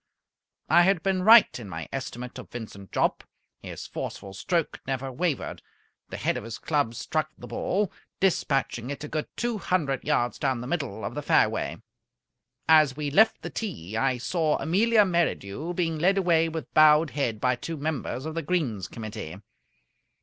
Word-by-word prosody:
I 170 +3 +6
had 175 -1 +3
been 190 -1 +1
right 220 - +7
in 110 -4 -8
my 80 -2 -6
estimate 125 -2 -5
of - - -10
Vincent 105 -5 -9
Jopp. - - 0 0.4
His - - -7
forceful 95 - -6
stroke 165 - -1
never 135 0 -2
wavered. 160 +1 -2 0.5
The - - -6
head - - 0
of - - -6
his 115 0 -6
club 145 -7 0
struck 155 +5 -2
the - - -10
ball, 200 +1 -1 0.3
despatching 135 -9 0
it 145 +1 -5
a - - -4
good 155 0 -3
two 235 -3 -1
hundred 145 -9 0
yards 125 -5 0
down 130 -3 0
the - - -6
middle 140 -6 -3
of - - -4
the - - -4
fairway. - - +1 0.8
As 155 -4 +5
we 145 -2 -2
left 220 +9 +4
the - - -5
tee 110 - -5
I 130 +2 +1
saw 155 +4 0
Amelia 210 +8 +3
Merridew 170 - -1
being 165 -3 -1
led 190 +4 +3
away 165 -3 +3
with 160 0 -6
bowed 155 0 +6
head 120 -7 -1
by 125 +2 +2
two 165 +6 -6
members 140 -3 -3
of 160 - -4
the 165 - -2
Greens 135 - -1
Committee. 110 -7 -7
150 Hz, 170 wpm, -26 LUFS, 125-175 Hz, 0.8 s, right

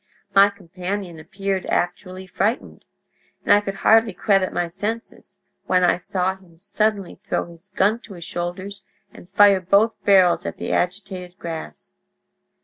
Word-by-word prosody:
My 200 +1 +7
companion 185 -2 -6
appeared 195 +3 -4
actually 185 +1 -2
frightened, 200 +5 -2 0.6
and - - +5
I 205 - +5
could 195 -1 -5
hardly 225 -1 +5
credit 195 -1 +1
my 175 - -1
senses 210 +7 -6 0.3
when 180 -1 +3
I 175 - +3
saw 185 +1 -1
him 180 -3 -21
suddenly 200 +1 -2
throw - - 0
his 170 +2 -14
gun 205 +4 +1
to 205 -4 -12
his 170 - -9
shoulders 185 +4 -5 0.3
and 175 - -15
fire 200 -1 +5
both 200 +5 +3
barrels 190 -3 +4
at - - -5
the - - -4
agitated 180 -1 -3
grass! 160 - -8
190 Hz, 145 wpm, -22 LUFS, 180-200 Hz, 0.6 s, My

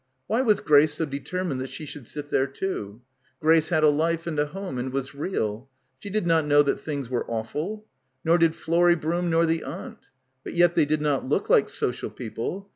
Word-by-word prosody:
Why 225 - +1
was 215 -6 +3
Grace 150 0 +5
so 160 - -1
deter 150 +6 -4
mined 140 -8 -2
that 130 - -5
she 145 +4 -7
should 140 -4 -9
sit 145 -1 -7
there 135 -1 +2
too? 125 - -5 0.4
Grace 160 0 +4
had 160 -3 +2
a 155 - +7
life 165 +3 0
and 160 -3 -2
a 150 - +2
home 185 -5 -5
and 130 +1 -3
was 135 0 -3
real. 135 - -3 0.3
She 200 - -8
did 210 -1 -1
not 165 -2 +3
know 145 0 +6
that 140 - 0
things 145 -4 -4
were 125 0 -1
awful. 150 - -4 0.4
Nor 170 +2 +4
did 165 -1 +3
Florrie 175 +1 +3
Broom, 170 +2 -1
nor 165 0 +3
the 165 0 0
aunt. 195 - -8 0.4
But - - -7
yet 175 0 +5
they 165 -3 +3
did 150 +1 0
not 145 -3 0
look - - 0
like - - +5
'social' - - -2
people. 125 - -5
155 Hz, 215 wpm, -25 LUFS, 140-175 Hz, 0.4 s, a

